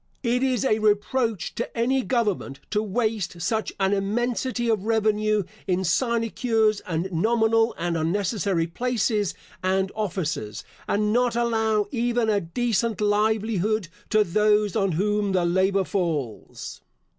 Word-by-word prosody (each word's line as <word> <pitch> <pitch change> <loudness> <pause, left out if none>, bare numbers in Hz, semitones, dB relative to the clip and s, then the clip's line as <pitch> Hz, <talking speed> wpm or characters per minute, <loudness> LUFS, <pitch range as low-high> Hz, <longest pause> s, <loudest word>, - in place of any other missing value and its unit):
It 245 0 +1
is 260 -3 +1
a 215 -4 +2
reproach 215 - 0
to 235 - -5
any 260 +3 +2
government 210 - -1
to 210 - +1
waste 215 -4 -2
such 220 +5 -1
an 195 +1 +2
immensity 240 +4 -1
of 215 -3 0
revenue 215 -1 +2 0.2
in 185 0 +1
sinecures 225 +2 +1
and 170 +1 -1
nominal 225 +5 +2
and 170 0 -1
unnecessary 185 +1 0
places 215 +1 -1 0.3
and 190 +1 +1
officers, 170 - -3 0.2
and 210 +1 +1
not 245 0 +2
allow 220 -3 +1
even 240 -2 +1
a 205 -1 +1
decent 230 +4 -1
livelihood 210 -1 +1 0.2
to 215 -1 +4
those 210 +2 +2
on 195 -4 +1
whom 205 +3 0
the 180 -2 +2
labour 190 +3 +2
falls. 160 - -3
210 Hz, 130 wpm, -24 LUFS, 190-230 Hz, 0.3 s, to